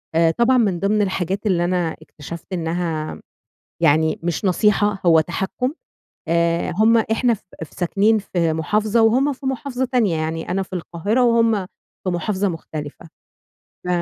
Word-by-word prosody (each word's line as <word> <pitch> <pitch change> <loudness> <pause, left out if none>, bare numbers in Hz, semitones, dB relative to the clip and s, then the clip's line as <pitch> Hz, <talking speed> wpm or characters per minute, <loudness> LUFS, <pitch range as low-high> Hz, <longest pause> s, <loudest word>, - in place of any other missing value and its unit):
آآ 165 0 +4
طبعًا 240 +6 +3
من 200 -7 +1
ضمن 210 +3 +1
الحاجات 190 +1 -2
اللي 180 -4 +2
أنا 175 -2 -1
اكتشفت 160 +3 -10
إنها 165 -2 -3 0.6
يعني 160 0 +3
مش 170 +3 -2
نصيحة 205 +1 +2
هو 165 -1 +6
تحكُّم، 190 - -2 0.6
آآ 170 0 +1
هُم 220 +3 +5
إحنا 225 +2 +1
ف - - -13 0.2
ف - - -19
ساكنين 205 +5 +2
في 170 -5 -1
مُحافظة 210 +8 +1
وهُم 260 +6 +3
في 265 0 -9
مُحافظة 260 0 -2
تانية، 235 -9 +1
يعني 160 +1 -3
أنا 190 +2 0
في 190 - -12
القاهرة 185 +7 -1
وهُم 230 -1 +4 0.5
في - - -2
مُحافظة 190 +3 -1
مُختلفة 155 -2 -7 0.8
ف - - -4
190 Hz, 150 wpm, -21 LUFS, 165-220 Hz, 0.8 s, هو